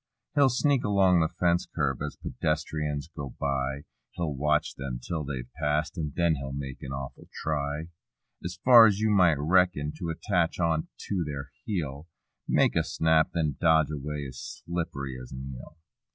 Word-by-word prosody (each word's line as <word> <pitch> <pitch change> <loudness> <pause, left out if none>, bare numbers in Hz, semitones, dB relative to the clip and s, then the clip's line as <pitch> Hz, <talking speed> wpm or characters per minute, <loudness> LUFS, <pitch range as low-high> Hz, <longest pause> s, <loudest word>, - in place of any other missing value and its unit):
He'll 140 -2 +5
sneak 135 +2 +2
along 95 -3 +4
the 80 - +3
fence 85 -1 +1
curb 70 -5 -1
as 75 0 -3
pedestrians 75 -2 -2
go 70 -3 -6
by; 70 0 -1 0.3
He'll 85 -4 -2
watch 75 +2 +1
them 65 -2 -5
'till 80 +5 -3
they've 65 -4 -5
past 75 +1 0
and 75 -4 -3
then 85 -3 +2
he'll 70 0 -5
make 70 -1 -6
an 65 - -6
awful 70 -1 -7
try, 75 0 -2 0.6
As 90 +1 -5
far 120 -3 +10
as 100 -2 +2
you 110 0 +2
might 90 -7 +5
reckon, 75 -1 +2
to 85 -3 -3
attach 85 +1 0
on 80 -2 +1 0.2
to 95 -4 0
their 70 -2 -6
heel; 80 - -3 0.4
Make - - +3
a - - +3
snap, 80 -1 +2
then 75 -4 0
dodge 80 -2 +4
away 75 0 -4
as 65 -1 -9
slip'ry 70 -7 -3
as 60 - -11
an 65 +1 -6
eel. 70 +5 -11
75 Hz, 170 wpm, -28 LUFS, 70-85 Hz, 0.6 s, far